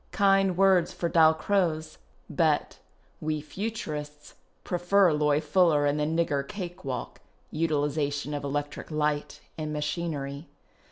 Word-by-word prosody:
Kind 195 -2 +3
words 190 -3 +4
for 170 - -2
Dalcroze; 160 0 +2 0.3
but - - 0 0.2
" - - -37
we 155 -1 0
Futurists 150 -5 -6 0.3
prefer 180 0 +3
Loie 150 -1 +2
Fuller 155 -1 +3
and 145 +1 +1
the 150 - +1
nigger 160 -2 0
cake 185 -1 -7
walk 130 -3 -5 0.3
(utiliza 150 -2 0
tion 145 +1 -4
of 145 - -3
electric 145 0 -4
light 150 -1 -2 0.2
and 155 -1 -3
machinery)." 150 -1 -3
155 Hz, 125 wpm, -27 LUFS, 150-175 Hz, 0.3 s, words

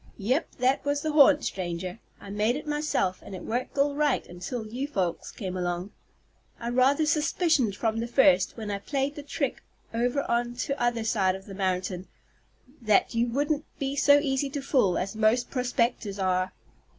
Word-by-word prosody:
"Yep. 250 +9 -1
That 260 +2 +2
was 285 0 -1
the 310 - 0
'haunt' 295 0 +6
stranger. 180 +2 -4 0.2
I 195 - -10
made 210 +4 +1
it 300 - -5
myself, 295 -11 -1
and 195 - -9
it 185 - -8
worked 245 +4 -3
all 285 +1 +3
right 290 -2 +1
until 180 +7 -6
you 245 +6 -4
folks 185 - -2
come 185 -4 -5
along. 180 +1 -2 0.7
I 235 - -3
rather 270 +5 +3
suspicioned 300 - +2
from 225 +1 -1
the 230 - -2
first, 195 -7 +4
when 215 -2 -4
I 200 - -2
played 275 +6 -1
the 295 - -7
trick 285 -1 -3 0.3
over 245 +4 0
on 240 0 -1
'tother 240 -3 -1
side 195 -4 +1
of 190 0 -10
the 200 - -9
mountain, 185 -1 -2 0.7
that 215 0 +3
you 235 +1 +1
wouldn't 290 +4 0
be 275 0 -2
so 285 0 +6
easy 275 -1 0
to 280 +1 -4
fool 250 - +2
as 195 +3 -3
most 220 +3 +2
prospectors 245 -5 -1
are." 185 -1 0
240 Hz, 175 wpm, -27 LUFS, 195-280 Hz, 0.7 s, haunt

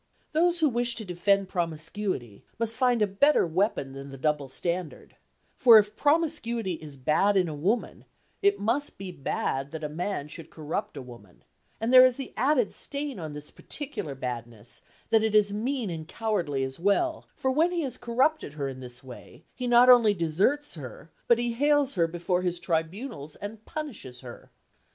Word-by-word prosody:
Those 340 +2 +2
who 310 - +5
wish 240 -1 -1
to 220 0 -6
defend 195 +2 +1
promiscuity 165 - -3
must 230 0 0
find 245 -3 +2
a - - +5
better 210 +9 +3
weapon 170 -5 0
than 135 +1 -8
the 135 - -9
double 145 0 -1
standard; 170 +3 -4 0.4
for 235 -4 +8
if 210 0 +2
promiscuity 290 - +1
is 155 -3 -8
bad 190 +10 +2
in 180 -2 +3
a 155 - -4
woman, 190 +11 -2 0.4
it 400 0 +3
must 250 +7 0
be 190 -1 -6
bad 135 -3 -2
that 160 +1 -7
a 150 - -2
man 165 -1 -3
should 160 +2 -10
corrupt 155 0 -5
a - - -6
woman, 110 -7 -15 0.4
and 230 +3 -1
there 255 0 +10
is 255 -1 +4
the 270 0 -7
added 260 -4 +2
stain 280 -5 -4
on 155 -3 -6
this 150 0 -9
particular 275 - -5
badness 120 -3 -7 0.3
that 225 - +5
it 220 -1 0
is 205 -1 +4
mean 235 -1 -2
and 160 -2 -6
cowardly 175 -13 -1
as 130 +2 -5
well, 205 - +1
for 265 - 0
when 320 +6 +2
he 350 -1 -1
has 265 - -3
corrupted 255 - 0
her 145 -2 -3
in 130 -1 -7
this 125 -1 -8
way, 130 -2 -12
he 250 - -4
not 240 +1 +6
only 235 -5 +7
deserts 195 - +1
her, 145 +1 -9 0.2
but 235 - +5
he 240 0 -1
hales 290 +2 +2
her 170 -3 +2
before 175 +2 -1
his 180 -1 -1
tribunals 165 - -3
and 210 +2 -8
punishes 240 - -7
her. 120 -2 -11
200 Hz, 185 wpm, -27 LUFS, 150-245 Hz, 0.4 s, there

